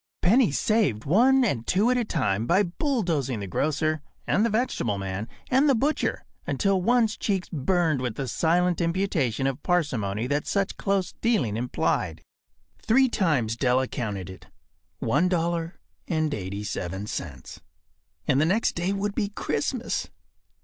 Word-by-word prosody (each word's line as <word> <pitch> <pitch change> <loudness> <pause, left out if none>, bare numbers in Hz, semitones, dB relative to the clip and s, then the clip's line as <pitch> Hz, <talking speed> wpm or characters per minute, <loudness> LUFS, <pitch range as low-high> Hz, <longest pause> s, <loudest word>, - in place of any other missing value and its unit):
Pennies 210 - +4
saved 205 - +1
one 250 - +4
and 120 - -1
two 210 +6 +3
at 250 - +2
a 245 - +1
time 110 - -1
by 190 +4 +4
bulldozing 170 - -1
the 100 - -4
grocer 155 - 0 0.2
and 205 - +2
the 230 - +2
vegetable 215 - 0
man 95 +2 -4 0.2
and 270 +3 +4
the 270 - +5
butcher 285 +7 0 0.2
until 195 -2 +1
one’s 230 +1 +3
cheeks 195 -3 -1
burned 160 -1 +1
with 125 -4 -2
the 135 - -3
silent 170 +9 +1
imputation 165 - 0
of 135 +1 -1
parsimony 120 - 0
that 145 +3 -1
such 200 -1 0
close 195 -2 0
dealing 180 - +1
implied. 110 -9 -1 0.6
Three 260 +3 +4
times 145 - +1
Della 130 +1 +2
counted 100 -8 -4
it. 95 - -13 0.5
One 145 - +1
dollar 170 -1 -1 0.3
and 155 -3 0
eighty 100 +1 -4
seven 95 -1 -4
cents. 75 -11 -7 0.7
And 135 - +3
the - - +4
next 200 +7 +2
day 175 +3 -1
would 200 +1 -2
be 205 -2 -1
Christmas. 205 - -2
165 Hz, 150 wpm, -26 LUFS, -, 0.7 s, the